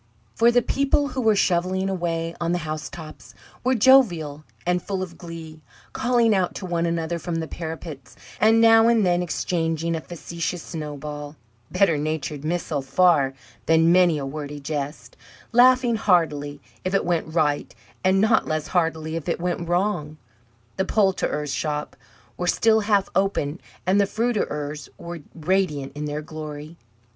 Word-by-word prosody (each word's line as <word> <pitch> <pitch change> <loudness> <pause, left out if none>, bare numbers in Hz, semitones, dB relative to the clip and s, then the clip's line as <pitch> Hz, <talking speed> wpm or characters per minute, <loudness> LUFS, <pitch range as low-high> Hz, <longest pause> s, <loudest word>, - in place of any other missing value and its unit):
For 230 +1 +4
the 240 0 +3
people 280 +1 +1
who 260 0 -3
were 220 -2 +4
shovelling 185 0 +1
away 170 -3 -2
on 170 0 0
the - - +1
housetops 155 +1 -7 0.3
were 255 +1 +2
jovial 190 - +4 0.2
and 180 0 +1
full 190 0 -3
of 175 -2 -8
glee, 165 -2 -9 0.3
calling 235 -2 +2
out 185 -3 0
to 190 - -5
one 170 -1 0
another 170 0 -2
from 170 +1 -4
the 165 -1 -2
parapets, 160 -5 -7 0.2
and 225 +1 +5
now 225 0 +6
and 230 -3 +4
then 175 -1 +2
exchanging 165 -1 -1
a 160 - -3
facetious 170 +1 -5
snowball 150 -1 -6 0.3
better 170 -7 +2
natured 150 -1 -3
missile 160 -3 -2
far 140 -2 +3 0.3
than 165 +1 +5
many 175 -3 +5
a 140 - -3
wordy 145 +1 -6
jest 145 0 -5 0.3
laughing 245 -1 +5
heartily 150 -8 +1 0.2
if 185 +1 -1
it 195 - +1
went 165 -2 -1
right, 150 -3 0 0.3
and 190 +1 +3
not 220 +2 +3
less 155 -1 -2
heartily 160 -2 0
if 165 +1 -4
it - - -1
went 175 -1 -2
wrong. 175 -5 0 0.6
The 190 - +1
poulterers' 185 -8 0
shops 150 -1 -3 0.4
were 180 - -2
still 220 +4 +4
half 205 -2 +2
open, 185 -5 0 0.2
and 190 +3 +4
the 200 - +2
fruiterers' 150 -11 -2
were 170 0 -7 0.2
radiant 160 -5 0
in 150 +1 -5
their 150 +1 -4
glory. 155 0 -8
170 Hz, 155 wpm, -24 LUFS, 155-195 Hz, 0.6 s, now